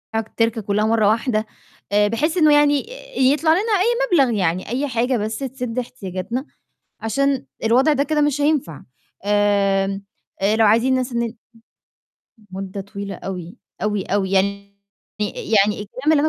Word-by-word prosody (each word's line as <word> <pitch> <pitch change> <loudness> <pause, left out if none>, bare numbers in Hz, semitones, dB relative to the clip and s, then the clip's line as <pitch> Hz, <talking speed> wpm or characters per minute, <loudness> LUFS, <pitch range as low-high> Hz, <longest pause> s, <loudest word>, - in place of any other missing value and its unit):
التِركة 225 +1 0
كلّها 210 +1 0
مرّة 220 -2 +3
واحدة، 220 0 +1 0.5
آآ، 205 0 +4
بحيث 305 - 0
إنه 310 -3 +5
يعني 290 -1 +4 0.4
آآ - - -2
يطلَع 290 +5 +4
لنا 340 +4 +3
أي 460 +1 +1
مبلغ 235 -4 -1
يعني 180 0 -1
أي 265 +5 -1
حاجة 245 0 0
بس 215 +1 -3
تسِد 250 -3 -4
إحتياجاتنا، 230 +1 -5 0.6
عشان 270 +4 0 0.2
الوضع 255 +7 +4
ده 280 - +2
كده 300 +1 0
مش 295 -1 +1
هينفع. 285 - 0 0.4
آمم، 200 -1 +1 0.5
لو 225 - +5
عايزين 230 +5 +4
ناس 255 0 -1
إن 235 -1 -2 1.2
مدّة 195 +1 -5
طويلة 200 0 -7
أوي، 180 -2 -7 0.3
أوي، 210 -2 0
أوي، 195 -1 -1
يعني 200 +1 0 0.5
يعني 210 0 +1
الكلام 255 +9 -1
اللي 300 -2 +4
225 Hz, 145 wpm, -21 LUFS, 200-275 Hz, 1.2 s, إنه